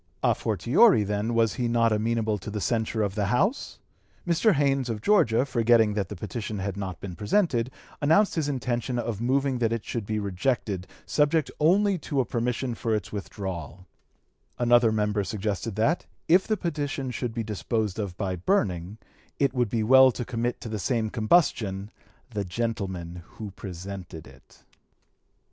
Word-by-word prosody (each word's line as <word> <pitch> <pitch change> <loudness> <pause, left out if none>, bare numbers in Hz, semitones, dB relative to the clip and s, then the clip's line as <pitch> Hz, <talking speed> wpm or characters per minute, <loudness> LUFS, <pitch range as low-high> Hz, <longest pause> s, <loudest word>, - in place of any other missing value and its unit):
A - - +4
fortiori, 115 - +4
then, 105 +3 -1
was 115 -3 +3
he 120 - -1
not 115 -1 +2
amenable 110 0 0
to 105 - -7
the 105 +1 -3
censure 110 0 0
of 100 -2 -1
the 105 -1 -1
House? 195 - 0 0.5
Mr. 175 +5 +3
Haynes, 135 -3 +1
of 110 -2 -2
Georgia, 120 - +3
forgetting 115 -4 +3
that 100 -3 -2
the 105 - -6
petition 105 +3 -5
had 95 0 -3
not 95 -4 -5
been 90 -3 -7
presented, 120 - +1 0.3
announced 165 +8 +4
his 155 -3 -1
intention 125 -2 -2
of 115 -3 -3
moving 135 +1 +1
that 115 -2 +1
it 115 -2 -2
should 115 -4 -4
be 110 - -1
rejected 100 -1 -1 0.2
subject 150 0 +1
only 190 +4 +3
to 145 -2 -2
a 130 - +2
permission 120 +2 -2
for 115 -1 -1
its 95 -3 -4
withdrawal; 95 -4 -6 0.7
another 120 -1 +4
member 105 -1 0
suggested 105 +2 -3
that, 130 - +1 0.2
if 180 +3 +4
the 215 - +1
petition 145 -6 -3
should 125 -1 -3
be 115 - -1
disposed 110 -1 -2
of 95 -4 -4
by 95 -3 -2
burning, 90 - 0 0.4
it 140 -2 +1
would 125 -4 +1
be 110 +1 0
well 130 +3 +7
to 120 0 -5
commit 120 0 -2
to 120 - -6
the 110 -1 -4
same 110 +3 -1
combustion 110 - +1 0.4
the 105 -3 -2
gentleman 95 -4 -4 0.2
who 105 -2 -6
presented 95 -3 -8
it. - - -19
115 Hz, 165 wpm, -26 LUFS, 100-130 Hz, 0.7 s, well